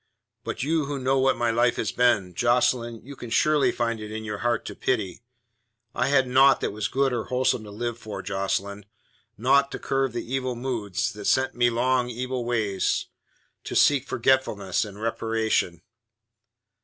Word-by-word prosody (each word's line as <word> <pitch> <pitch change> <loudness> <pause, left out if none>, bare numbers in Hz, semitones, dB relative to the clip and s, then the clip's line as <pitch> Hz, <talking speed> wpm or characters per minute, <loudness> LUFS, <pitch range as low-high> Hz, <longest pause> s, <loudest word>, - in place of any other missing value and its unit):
But - - -4
you 155 +1 +1
who 145 0 -3
know 135 +1 +1
what 135 -1 +2
my 120 -1 +1
life 120 +1 +2
has - - -2
been, 115 -7 +2
Jocelyn, 120 +1 +1
you 140 +2 -10
can 120 - -9
surely 150 +5 +3
find 115 -1 -2
it 105 0 -7
in 110 0 -5
your 105 -2 -5
heart 120 -2 0
to - - -7
pity. 110 -6 -2 0.7
I - - 0
had 135 -2 +3
naught 135 +2 +5
that - - -1
was 105 +1 -2
good 135 0 +1
or 120 -2 -2
wholesome 125 -2 0
to - - -10
live 120 +3 -4
for, 110 -3 -7
Jocelyn; 100 +1 -2 0.5
naught 140 +5 +3
to - - -3
curb 135 -2 -1
the 120 - -4
evil 130 -2 -1
moods 120 -3 -2
that 105 -1 -9
sent 130 0 +2
me 120 0 +3
along 125 +1 +1
evil 125 +1 -3
ways 110 -5 -1 0.5
to - - -6
seek 145 -3 +4
forgetfulness 115 -7 +1
and 100 -1 -10
reparation. 110 -6 -1
120 Hz, 175 wpm, -25 LUFS, 110-130 Hz, 0.7 s, naught